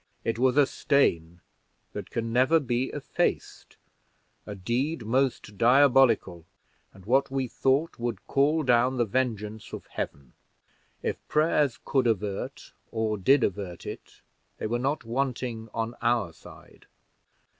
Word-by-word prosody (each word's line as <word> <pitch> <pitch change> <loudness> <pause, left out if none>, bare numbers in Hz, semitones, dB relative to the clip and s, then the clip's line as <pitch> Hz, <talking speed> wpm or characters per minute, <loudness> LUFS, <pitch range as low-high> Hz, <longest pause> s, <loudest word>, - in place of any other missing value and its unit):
It 115 0 -2
was 130 +1 +3
a 145 - +7
stain 85 - +1 0.5
that - - -6
can 115 0 -3
never 130 +7 +4
be 125 -3 -1
effaced - - -3 0.7
a 105 - -5
deed 120 - -2
most 120 -4 -1
diabolical, 125 - +4 0.5
and 95 -1 -17
what 135 +4 +2
we 135 -1 -1
thought 135 +6 0
would 115 -4 -4
call 150 +3 +2
down 125 0 +3
the 120 - +2
vengeance 110 -2 -3
of - - -7
Heaven. 70 -3 -6 0.7
If - - -1
prayers 150 -4 +2
could 130 -3 +2
avert, 105 -3 -3 0.2
or 110 -1 -1
did 130 +7 +3
avert 90 -3 -3
it, - - -9 0.4
they - - -5
were 120 +3 -1
not 140 +4 -1
wanting 120 -2 -3
on 115 +1 -3
our 120 -8 +1
side." - - -16
120 Hz, 135 wpm, -27 LUFS, 110-135 Hz, 0.7 s, a